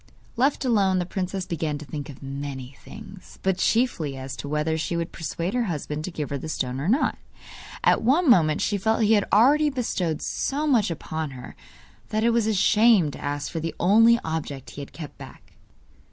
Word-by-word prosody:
Left 270 Hz, +3 st, +1 dB
alone, 200 Hz, -6 st, +3 dB
the 180 Hz, -, 0 dB
princess 185 Hz, +1 st, -3 dB
began 155 Hz, -3 st, -2 dB
to 150 Hz, -, -9 dB
think 145 Hz, +1 st, -6 dB
of 140 Hz, 0 st, -11 dB
many 135 Hz, -1 st, -6 dB
things, 200 Hz, -3 st, -12 dB
but 190 Hz, -1 st, +1 dB
chiefly 175 Hz, -, +1 dB
as 130 Hz, +1 st, -6 dB
to -, -, -6 dB
whether 150 Hz, +2 st, 0 dB
she 165 Hz, +2 st, -2 dB
would 170 Hz, -1 st, -3 dB
persuade 170 Hz, +4 st, -4 dB
her 245 Hz, -1 st, +1 dB
husband 150 Hz, -4 st, -4 dB
to 185 Hz, -, -5 dB
give 150 Hz, -4 st, -5 dB
her 140 Hz, -, -2 dB
the 160 Hz, -, -6 dB
stone 130 Hz, -3 st, -2 dB
or 145 Hz, -, -3 dB
not. 250 Hz, +9 st, +1 dB, 0.6 s
At -, -, +4 dB
one 290 Hz, +9 st, +3 dB
moment 160 Hz, -, +4 dB
she 205 Hz, -1 st, 0 dB
felt 220 Hz, +3 st, +1 dB
he 215 Hz, +1 st, +4 dB
had 205 Hz, -2 st, +3 dB
already 290 Hz, +8 st, +5 dB
bestowed 185 Hz, -, -2 dB
so 290 Hz, +3 st, -2 dB
much 240 Hz, -10 st, +3 dB
upon 155 Hz, -4 st, -5 dB
her 125 Hz, -, -10 dB, 0.5 s
that 215 Hz, 0 st, 0 dB
it 235 Hz, -, +4 dB
was 230 Hz, -2 st, +1 dB
a 220 Hz, -, +2 dB
shame 210 Hz, -5 st, +4 dB
to -, -, -10 dB
ask 145 Hz, 0 st, -3 dB
for 165 Hz, -, -3 dB
the 165 Hz, +1 st, -4 dB
only 225 Hz, +6 st, +6 dB
object 155 Hz, -4 st, -4 dB
he 145 Hz, -, -8 dB
had 140 Hz, -, -9 dB
kept 155 Hz, -4 st, -10 dB
back. -, -, -13 dB
175 Hz, 205 wpm, -25 LUFS, 150-220 Hz, 0.6 s, only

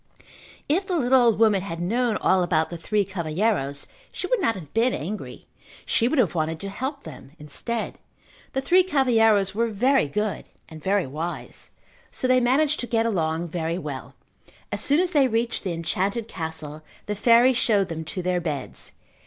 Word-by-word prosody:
If 365 Hz, +7 st, +1 dB
the 365 Hz, -3 st, 0 dB
little 260 Hz, -2 st, +4 dB
old 230 Hz, -3 st, +4 dB
woman 215 Hz, -3 st, +4 dB
had 170 Hz, -3 st, -5 dB
known 225 Hz, +5 st, 0 dB
all 185 Hz, -, +3 dB
about 165 Hz, -2 st, +1 dB
the 170 Hz, -, -5 dB
three 205 Hz, +4 st, 0 dB
cavalheiros 170 Hz, -5 st, -1 dB, 0.3 s
she -, -, -5 dB
would -, -, +1 dB
not 230 Hz, -, +2 dB
have 160 Hz, -7 st, -10 dB
been 235 Hz, +3 st, +2 dB
angry. 195 Hz, +8 st, -6 dB, 0.4 s
She 230 Hz, -, +2 dB
would 295 Hz, -, 0 dB
have 210 Hz, -, +3 dB
wanted 160 Hz, -1 st, -1 dB
to 200 Hz, -, -4 dB
help 265 Hz, +7 st, -4 dB
them 135 Hz, -, -11 dB
instead. 165 Hz, +10 st, -4 dB, 0.5 s
The 265 Hz, -, 0 dB
three 360 Hz, +7 st, +5 dB
cavalheiros 225 Hz, -, +3 dB
were 230 Hz, +3 st, +1 dB
very 245 Hz, -, +2 dB
good 210 Hz, +7 st, -2 dB, 0.2 s
and 155 Hz, -1 st, -11 dB
very 195 Hz, -1 st, +2 dB
wise, 155 Hz, +6 st, -6 dB, 0.4 s
so 255 Hz, -, -3 dB
they 255 Hz, 0 st, +5 dB
managed 285 Hz, +5 st, +2 dB
to 245 Hz, -, -3 dB
get 230 Hz, -2 st, +1 dB
along 165 Hz, -5 st, -1 dB
very 165 Hz, 0 st, -2 dB
well. 145 Hz, -7 st, -7 dB, 0.6 s
As -, -, -3 dB
soon 290 Hz, +3 st, +2 dB
as 360 Hz, -1 st, +1 dB
they 285 Hz, -5 st, +4 dB
reached 230 Hz, 0 st, -1 dB
the 190 Hz, -, -2 dB
enchanted 195 Hz, +7 st, -1 dB
castle 160 Hz, -4 st, -6 dB, 0.2 s
the 210 Hz, -, -2 dB
fairy 235 Hz, +5 st, +5 dB
showed 210 Hz, -6 st, +2 dB
them 160 Hz, -1 st, -4 dB
to 180 Hz, +3 st, -5 dB
their 180 Hz, 0 st, 0 dB
beds. 150 Hz, -5 st, -5 dB
210 Hz, 180 wpm, -24 LUFS, 165-245 Hz, 0.6 s, three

